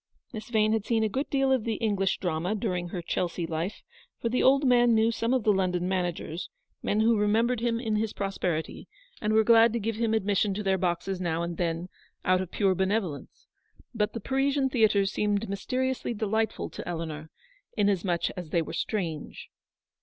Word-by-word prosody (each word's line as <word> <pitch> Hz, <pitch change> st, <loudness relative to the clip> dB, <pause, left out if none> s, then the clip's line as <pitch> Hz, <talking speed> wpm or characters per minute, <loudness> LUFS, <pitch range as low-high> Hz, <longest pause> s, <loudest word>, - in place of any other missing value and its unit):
Miss 220 Hz, 0 st, -7 dB
Vane 215 Hz, -2 st, +2 dB
had 220 Hz, -2 st, 0 dB
seen 225 Hz, 0 st, +1 dB
a -, -, +3 dB
good 270 Hz, +6 st, -2 dB
deal 270 Hz, -1 st, +2 dB
of 260 Hz, -4 st, +2 dB
the 225 Hz, -1 st, -1 dB
English 200 Hz, -3 st, 0 dB
drama 175 Hz, +3 st, -1 dB
during 185 Hz, -5 st, -2 dB
her 175 Hz, 0 st, -5 dB
Chelsea 175 Hz, 0 st, -2 dB
life, 165 Hz, +5 st, -4 dB, 0.4 s
for 230 Hz, -, -1 dB
the 250 Hz, -, +1 dB
old 275 Hz, +2 st, +4 dB
man 240 Hz, -2 st, +5 dB
knew 220 Hz, +1 st, +3 dB
some 230 Hz, +1 st, -1 dB
of 255 Hz, -3 st, +2 dB
the 210 Hz, -, +4 dB
London 180 Hz, -2 st, 0 dB
managers, 175 Hz, -2 st, -2 dB, 0.3 s
men 210 Hz, +2 st, +1 dB
who 225 Hz, -1 st, +3 dB
remembered 225 Hz, +4 st, +2 dB
him 230 Hz, 0 st, 0 dB
in 220 Hz, -3 st, -1 dB
his 220 Hz, 0 st, -1 dB
prosperity, 180 Hz, -5 st, -3 dB, 0.3 s
and 210 Hz, -, 0 dB
were 220 Hz, 0 st, +5 dB
glad 230 Hz, +1 st, +6 dB
to 235 Hz, -, 0 dB
give 220 Hz, 0 st, -2 dB
him 225 Hz, -1 st, +1 dB
admission 205 Hz, -1 st, +1 dB
to 210 Hz, -, -3 dB
their 190 Hz, -1 st, +1 dB
boxes 180 Hz, +1 st, -1 dB
now 170 Hz, -1 st, -1 dB
and 170 Hz, -1 st, -4 dB
then, 170 Hz, 0 st, -1 dB, 0.4 s
out 185 Hz, 0 st, +3 dB
of 185 Hz, -, -5 dB
pure 195 Hz, -1 st, +2 dB
benevolence. 190 Hz, -5 st, -2 dB, 0.5 s
But 210 Hz, -2 st, 0 dB
the 230 Hz, -, -4 dB
Parisian 270 Hz, +3 st, +1 dB
theatres 215 Hz, -5 st, +3 dB
seemed 210 Hz, +1 st, 0 dB
mysteriously 255 Hz, +5 st, -2 dB
delightful 220 Hz, +1 st, -1 dB
to -, -, -8 dB
Eleanor, 160 Hz, -2 st, -5 dB, 0.5 s
inasmuch 195 Hz, -4 st, +1 dB
as 180 Hz, -3 st, -8 dB
they 170 Hz, 0 st, +1 dB
were -, -, -8 dB
strange. 170 Hz, -8 st, -4 dB
210 Hz, 190 wpm, -28 LUFS, 180-225 Hz, 0.5 s, glad